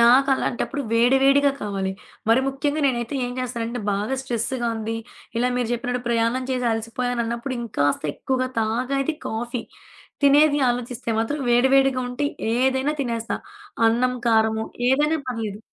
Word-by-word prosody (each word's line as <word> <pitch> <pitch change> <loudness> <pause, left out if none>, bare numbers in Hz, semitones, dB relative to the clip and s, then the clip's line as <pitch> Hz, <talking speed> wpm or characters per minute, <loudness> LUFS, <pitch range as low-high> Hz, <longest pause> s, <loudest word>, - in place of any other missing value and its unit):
నాకు 250 +4 +6
అలాంటప్పుడు 275 +3 -2
వేడి 240 +3 +4
వేడిగా 280 +1 +5
కావాలి. 195 -2 -2 0.4
మరి 230 +3 +5
ముఖ్యంగా 285 +3 -1
నేనైతే 240 0 -1
ఏం 245 - -5
చేస్తానంటే 240 -1 -3
బాగా 205 +6 -1
స్ట్రెస్‌గా 240 0 -2
ఉంది. 225 +1 -3 0.4
ఇలా 245 +2 +2
మీరు 245 -2 0
జెప్పినట్టు 245 +1 -2
ప్రయాణం 235 +2 +1
చేసి 250 -1 0
అలసిపోయాని 235 +2 -2
అన్నప్పుడు 235 +3 -3
ఇంకాస్త 145 -11 0
ఎక్కువగా 255 -1 -1
తాగేది 255 +7 0
కాఫీ. 235 +2 -3 0.6
తినేది 290 +1 +5
ఆలోచిస్తే 245 -1 -3
మాత్రం 255 +7 -1
వేడి 245 +2 +5
వేడిగా 270 -1 +4
ఉంటే 250 +4 -2 0.3
ఏదైనా 265 +3 +2
తినేస్తా. 230 -3 -2 0.5
అన్నం 250 +3 +2
కారము 220 -1 +3 0.3
ఏదైనా 300 +4 +2
పర్లేదు. 220 -4 -3
245 Hz, 135 wpm, -23 LUFS, 230-265 Hz, 0.6 s, నాకు